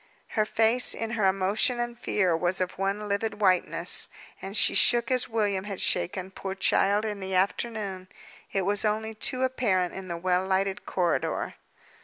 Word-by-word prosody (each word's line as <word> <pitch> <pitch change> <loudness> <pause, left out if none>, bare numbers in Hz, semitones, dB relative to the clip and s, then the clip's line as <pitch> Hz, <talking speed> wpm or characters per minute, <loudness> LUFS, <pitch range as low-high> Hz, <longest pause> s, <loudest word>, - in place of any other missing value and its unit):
Her 215 -2 0
face, 225 +3 +4
in 225 0 -4
her 215 -5 +1
emotion 195 +6 +1
and 240 0 -3
fear, 190 -7 0
was 175 +3 -1
of 185 0 -3
one 200 +2 -2
livid 205 +2 -2
whiteness, 185 -3 +3 0.3
and 195 +2 -5
she - - +4
shook 240 0 +3
as 255 -1 +1
William 205 -4 -1
had 200 -2 -5
shaken, 185 - -1
poor 190 0 -6
child, 200 +2 +2
in 210 -2 -4
the 190 -1 -4
afternoon. 195 -1 -2 0.4
It 195 - -1
was 205 +3 0
only 220 +1 -1
too 255 +4 -1
apparent 205 -9 0
in 190 -1 -8
the 170 -1 -4
well 180 +1 0
lighted 195 +1 -1
corridor. 175 -2 -1
200 Hz, 170 wpm, -26 LUFS, 190-220 Hz, 0.4 s, face